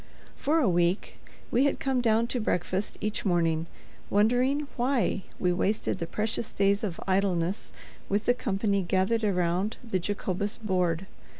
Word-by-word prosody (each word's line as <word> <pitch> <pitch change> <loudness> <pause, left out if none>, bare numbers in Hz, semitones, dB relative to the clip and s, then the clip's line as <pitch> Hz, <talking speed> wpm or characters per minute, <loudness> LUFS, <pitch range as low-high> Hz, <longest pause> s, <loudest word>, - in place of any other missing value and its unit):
For 305 +4 +1
a 295 -8 +3
week 175 +1 +1 0.3
we 255 +4 +4
had 280 - +1
come 265 -2 +1
down 225 -1 +3
to 250 - 0
breakfast 190 -1 -1
each 215 0 -2
morning, 165 -3 +1 0.4
wondering 250 +8 +2
why 245 -5 +1 0.2
we 180 -1 +1
wasted 190 +1 0
the 170 - -3
precious 220 +4 -2
days 200 +1 +2
of 185 -6 -3
idleness 185 -1 0 0.4
with 205 +2 0
the 245 - +4
company 200 -4 0
gathered 190 +5 +1
around 185 +1 0
the 190 -5 0
Jacobus 200 +2 -2
board. 185 -5 0
200 Hz, 145 wpm, -28 LUFS, 180-225 Hz, 0.4 s, we